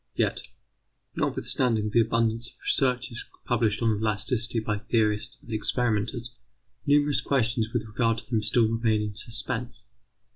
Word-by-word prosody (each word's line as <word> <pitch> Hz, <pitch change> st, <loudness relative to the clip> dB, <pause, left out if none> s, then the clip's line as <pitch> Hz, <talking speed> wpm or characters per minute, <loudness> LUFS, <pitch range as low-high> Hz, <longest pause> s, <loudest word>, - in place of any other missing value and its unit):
Yet, -, -, 0 dB, 0.8 s
notwithstanding 110 Hz, -5 st, 0 dB
the 115 Hz, -, +5 dB
abundance 115 Hz, +1 st, +1 dB
of -, -, -19 dB
researches 125 Hz, -2 st, +1 dB, 0.2 s
published 115 Hz, -2 st, +1 dB
on 110 Hz, -2 st, +3 dB
elasticity 110 Hz, +2 st, +1 dB
by 105 Hz, -2 st, -2 dB
theorists 110 Hz, -1 st, 0 dB
and 115 Hz, -, -8 dB
experimenters, 115 Hz, +1 st, -1 dB, 0.6 s
numerous 145 Hz, -2 st, +4 dB
questions 120 Hz, -4 st, 0 dB
with 115 Hz, -3 st, -1 dB
regard 115 Hz, +1 st, 0 dB
to -, -, -8 dB
them 115 Hz, -3 st, 0 dB
still 110 Hz, +2 st, +3 dB
remain 110 Hz, -1 st, +1 dB
in 105 Hz, -1 st, -4 dB
suspense. 115 Hz, +3 st, -5 dB
115 Hz, 135 wpm, -26 LUFS, 110-120 Hz, 0.8 s, the